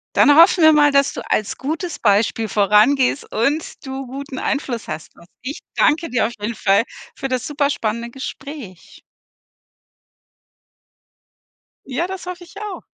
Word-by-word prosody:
Dann 290 Hz, -, +6 dB
hoffen 340 Hz, 0 st, +6 dB
wir 315 Hz, -, +8 dB
mal, 295 Hz, -1 st, +5 dB
dass 280 Hz, 0 st, +3 dB
du -, -, -6 dB
als 215 Hz, -, 0 dB
gutes 320 Hz, +5 st, -4 dB
Beispiel 220 Hz, +1 st, +2 dB
vorangehst 215 Hz, +8 st, +3 dB
und 285 Hz, +6 st, -1 dB
du 265 Hz, -1 st, -6 dB
guten 270 Hz, 0 st, -7 dB
Einfluss 265 Hz, -5 st, -2 dB
hast. 155 Hz, 0 st, -7 dB
Und -, -, -16 dB, 0.2 s
ich 270 Hz, +4 st, -6 dB, 0.2 s
danke 330 Hz, +3 st, +2 dB
dir 240 Hz, -3 st, +1 dB
auf 235 Hz, -, -7 dB
jeden 210 Hz, +2 st, -3 dB
Fall 200 Hz, +2 st, +3 dB, 0.3 s
für 270 Hz, -, -3 dB
das 255 Hz, -2 st, -2 dB
super 290 Hz, -1 st, 0 dB
spannende 235 Hz, -2 st, -3 dB
Gespräch. 265 Hz, -, -9 dB, 2.9 s
Ja, 275 Hz, +7 st, -2 dB
das 380 Hz, -1 st, -7 dB
hoffe 360 Hz, 0 st, -7 dB
ich 350 Hz, -, -17 dB
auch. 420 Hz, -3 st, -7 dB
270 Hz, 150 wpm, -20 LUFS, 230-300 Hz, 2.9 s, wir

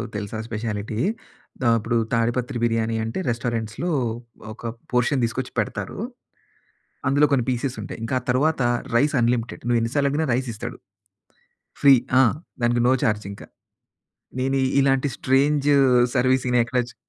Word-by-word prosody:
తెలుసా 105 Hz, +1 st, -4 dB
speciality, 110 Hz, -1 st, -4 dB, 0.6 s
the -, -, -2 dB
అపుడు, 115 Hz, +2 st, -1 dB, 0.2 s
తాడిపత్రి 120 Hz, +2 st, 0 dB
బిర్యానీ 115 Hz, -1 st, +1 dB
అంటే, 115 Hz, +9 st, -3 dB
రెస్టారెంట్స్‌లో 115 Hz, +6 st, -2 dB, 0.6 s
ఒక 120 Hz, -, -16 dB, 0.3 s
పోర్షన్ 125 Hz, +2 st, +2 dB
తీసుకొచ్చి 125 Hz, +2 st, -2 dB
పెడతారూ. -, -, -3 dB, 1.1 s
అందులో 145 Hz, +2 st, +4 dB
కొన్ని 130 Hz, -4 st, +2 dB
పీసెస్ 125 Hz, +1 st, -2 dB
ఉంటాయి. -, -, -7 dB
ఇంకా 115 Hz, +3 st, -2 dB
ఆ -, -, -22 dB
తరువాత, 140 Hz, +3 st, +1 dB, 0.4 s
రైస్ 145 Hz, +4 st, +2 dB
అన్‌లిమిటెడ్, 120 Hz, 0 st, 0 dB
నువ్వేన్ని 115 Hz, -1 st, +1 dB
సార్లడిగినా 145 Hz, +2 st, +1 dB
రైసిస్తాడు. 120 Hz, -3 st, -4 dB, 1.1 s
ఫ్రీ. 140 Hz, -1 st, +8 dB, 0.3 s
ఆ! -, -, +8 dB, 0.4 s
దానికి 120 Hz, 0 st, +2 dB
నో -, -, +5 dB
చార్జింక. 105 Hz, -4 st, -2 dB, 1.0 s
నేనీ 135 Hz, +1 st, +1 dB, 0.2 s
ఇలాంటి 135 Hz, 0 st, +2 dB
స్ట్రేంజూ 145 Hz, +2 st, +2 dB, 0.4 s
సర్విసింగ్‌నెక్కడ 125 Hz, -1 st, +2 dB
చు -, -, -17 dB
125 Hz, 120 wpm, -23 LUFS, 115-135 Hz, 1.1 s, ఫ్రీ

